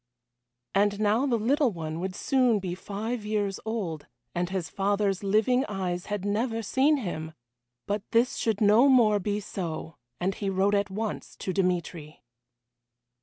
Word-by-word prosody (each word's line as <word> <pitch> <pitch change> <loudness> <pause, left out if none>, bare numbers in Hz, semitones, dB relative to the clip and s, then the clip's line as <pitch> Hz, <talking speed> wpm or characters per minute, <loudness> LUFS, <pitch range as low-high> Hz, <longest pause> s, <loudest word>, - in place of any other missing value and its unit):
And 205 +1 +2
now 215 +6 +2
the 240 -3 +2
little 255 +4 +2
one 160 -3 -5
would 185 +1 -3
soon 255 -3 +2
be 185 -3 -3
five 210 +5 -4
years 210 -2 -1
old, 195 -9 -3 0.3
and 175 0 -1
his 185 -4 -2
father's 200 +2 0
living 220 +6 +3
eyes 180 -3 -3
had 205 -2 -3
never 225 +2 -1
seen 275 +7 +3
him! 160 - -4 0.5
But 205 0 -1
this 235 +2 +2
should 220 -2 0
no 215 +6 +6
more 225 -6 +5
be 205 +2 -1
so, 165 -5 -5 0.2
and 190 +2 0
he 200 +1 -3
wrote 195 +1 +2
at 200 0 +1
once 210 +2 -4
to 185 - -4
Dmitry. 175 -6 -2
205 Hz, 155 wpm, -27 LUFS, 185-225 Hz, 0.5 s, no